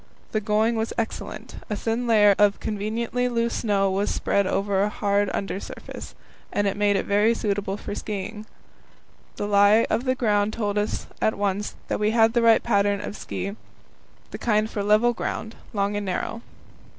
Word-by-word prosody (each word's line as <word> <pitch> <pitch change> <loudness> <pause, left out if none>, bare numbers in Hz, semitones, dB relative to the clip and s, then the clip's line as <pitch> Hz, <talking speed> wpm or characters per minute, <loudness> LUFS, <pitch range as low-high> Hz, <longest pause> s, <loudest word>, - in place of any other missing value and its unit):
The 215 - 0
going 220 +2 +2
was 225 0 -2
excellent; 230 -1 -5
a 210 - -1
thin 230 +4 -2
layer 210 -3 +6
of 205 -1 +4
conveniently 225 +4 -2
loose 235 -1 0
snow 200 -3 +1
was 195 +2 0
spread 200 -1 +1
over 195 0 0
a 205 - +2
hard 205 -1 +1
under 195 -1 -3
surface, - - -9 0.4
and 205 - 0
made 205 0 +2
it - - 0
very 210 +3 +3
suitable 200 -2 -2
for - - -6
skiing. 210 +1 -5 0.9
The - - -3
lie 205 +2 +5
of 230 +4 0
the 255 0 +2
ground 210 -3 +1
told 210 -2 -1
us 210 - -2 0.2
at 220 - +1
once 205 0 -1
that - - -1
we 210 0 +2
had 225 0 +4
the 240 - +3
right 230 -1 +5
pattern 200 -2 +2
of 205 - -6
ski 200 -1 -5 0.8
the - - -6
kind 215 -2 +2
for 210 - -4
level 215 +4 +4
ground, 220 -1 -4 0.2
long 200 0 0
and 205 -1 -3
narrow. 205 +5 -3
210 Hz, 175 wpm, -24 LUFS, 200-225 Hz, 0.9 s, layer